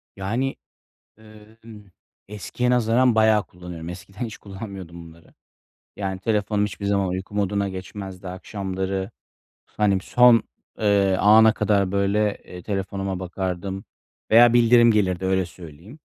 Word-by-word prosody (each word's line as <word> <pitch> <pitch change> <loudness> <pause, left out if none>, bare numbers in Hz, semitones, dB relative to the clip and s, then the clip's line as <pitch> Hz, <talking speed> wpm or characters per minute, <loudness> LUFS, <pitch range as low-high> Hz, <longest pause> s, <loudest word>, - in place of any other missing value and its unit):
Yani, 115 +8 -2 0.6
ııı, 110 0 -17
ımm, 105 -4 -13 0.4
eskiye 105 +4 -3
nazaran 120 0 +3
bayağı 110 -1 +4
kullanıyorum. 90 -2 -9
Eskiden 95 +6 -7
hiç 110 - -7
kullanmıyordum 95 -4 -9
bunları. 80 0 -19 0.6
Yani, 95 -2 -4
telefonum 105 -1 0
hiçbir 100 0 -6
zaman 100 -1 +1
uyku 95 +3 -5
moduna 100 0 0
geçmezdi 95 0 -8
akşamları. 95 +1 -4 0.5
Hani, 100 -3 0
son, 120 +1 +5 0.4
eee, 100 -3 +3
ana 110 +1 +6
kadar, 100 -4 +1
böyle, 100 +1 +1
eee, 90 -1 -11
telefonuma 95 -1 -3
bakardım 95 +1 -4 0.5
veya 120 +1 +7
bildirim 120 0 +5
gelirdi, 95 -4 0
öyle 95 0 +1
söyleyeyim. 85 - -13
100 Hz, 125 wpm, -23 LUFS, 95-110 Hz, 0.6 s, veya